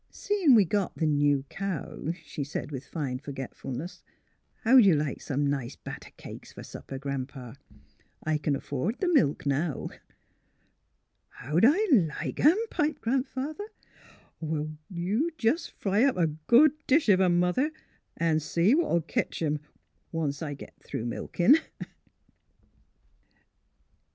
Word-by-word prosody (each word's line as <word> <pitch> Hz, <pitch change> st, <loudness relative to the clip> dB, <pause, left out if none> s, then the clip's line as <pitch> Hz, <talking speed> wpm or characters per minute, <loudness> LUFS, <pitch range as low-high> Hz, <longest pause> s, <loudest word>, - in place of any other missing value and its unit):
" -, -, -43 dB
Seein' 385 Hz, -10 st, +3 dB
we 210 Hz, -4 st, +6 dB
got 200 Hz, +2 st, -1 dB
the 160 Hz, -, -1 dB
new 145 Hz, -2 st, +2 dB
cow," 185 Hz, -4 st, -4 dB
she 145 Hz, -, -4 dB
said, 145 Hz, +1 st, -5 dB
with 135 Hz, -1 st, -6 dB
fine 135 Hz, -6 st, -3 dB
forgetfulness, 135 Hz, +2 st, -7 dB, 0.3 s
" -, -, -40 dB
how'd 250 Hz, +1 st, +7 dB
you 190 Hz, -5 st, +6 dB
like 145 Hz, -2 st, -2 dB
some 145 Hz, 0 st, -1 dB
nice 140 Hz, -3 st, -2 dB
batter -, -, -9 dB
cakes -, -, -10 dB
fer -, -, -9 dB
supper. 135 Hz, -, -8 dB
Gran 135 Hz, -1 st, -3 dB
'pa? 125 Hz, -5 st, -10 dB, 0.7 s
I 155 Hz, -1 st, 0 dB
c'n 145 Hz, -1 st, 0 dB
afford 145 Hz, -, -3 dB
th' -, -, 0 dB
milk, 185 Hz, -, +2 dB
now." 145 Hz, +2 st, -1 dB, 0.7 s
'' -, -, -46 dB
How'd 155 Hz, -, +3 dB
I 295 Hz, +7 st, +4 dB
like 170 Hz, -, +1 dB
'em? 315 Hz, +7 st, +6 dB
" -, -, -35 dB
piped 300 Hz, +1 st, -1 dB
Grandfather. 270 Hz, -, -2 dB, 0.4 s
" -, -, -27 dB
Well, 155 Hz, -1 st, -3 dB
you 200 Hz, -, 0 dB
jes' 265 Hz, +9 st, +1 dB
fry 205 Hz, +3 st, 0 dB
up 270 Hz, -8 st, +2 dB
a 175 Hz, -, +3 dB
good 235 Hz, -, +4 dB, 0.2 s
dish 290 Hz, +2 st, +4 dB
of 190 Hz, -3 st, +5 dB
'em, 175 Hz, -2 st, +4 dB
Mother, 180 Hz, -, +2 dB, 0.5 s
an' 165 Hz, -2 st, +2 dB
see 170 Hz, -, +2 dB
what 335 Hz, +3 st, +3 dB
'11 170 Hz, -, +2 dB
ketch -, -, -2 dB
'em 150 Hz, -1 st, 0 dB, 0.3 s
— -, -, -45 dB
once 150 Hz, -4 st, -2 dB
I 145 Hz, -3 st, -4 dB
git -, -, -11 dB
through 115 Hz, -, -5 dB
milkin'." 175 Hz, -, +3 dB
165 Hz, 155 wpm, -28 LUFS, 145-230 Hz, 0.7 s, how'd